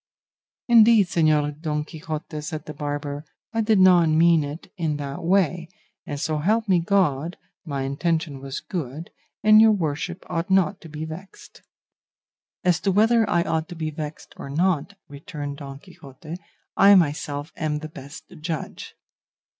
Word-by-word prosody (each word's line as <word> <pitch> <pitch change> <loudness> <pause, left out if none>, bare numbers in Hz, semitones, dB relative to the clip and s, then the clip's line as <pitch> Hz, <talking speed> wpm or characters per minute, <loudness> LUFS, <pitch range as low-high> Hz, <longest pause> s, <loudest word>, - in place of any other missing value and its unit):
"Indeed, 230 -3 +6
Señor 155 -3 +1
Don 150 -2 -1
Quixote," 155 -1 -6
said 155 +1 -6
the 155 - -7
barber, 145 0 -4 0.3
"I 225 - +1
did 215 -1 +3
not 180 -3 +6
mean 165 0 +4
it 145 +3 -8
in 160 -5 -1
that 140 0 -6
way, 175 -2 +1 0.4
and, 145 - -4
so 155 +1 -1
help 215 +8 +1
me 185 -3 +4
God, 170 -4 +1 0.3
my 140 -4 -3
intention 150 +1 -1
was 135 +1 -6
good, 160 -2 -6 0.3
and 215 0 +7
your 220 0 +7
worship 170 -1 -3
ought 165 +1 -3
not 190 +1 +2
to 165 - -11
be 155 +1 -5
vexed." 170 +5 -11 1.0
"As 180 -3 +3
to 195 - 0
whether 220 +3 +3
I 170 -1 +2
ought 160 -1 -2
to 175 - -7
be 160 -1 -3
vexed 150 0 -7
or - - -8
not," 175 +4 0
returned 145 -1 -7
Don 140 -1 -8
Quixote, 145 +4 -11 0.4
"I 200 +1 +7
myself 150 -2 0
am 150 -1 -2
the 155 +1 -6
best 140 -2 -11 0.2
judge." 160 -1 -5
160 Hz, 155 wpm, -24 LUFS, 150-180 Hz, 1.0 s, and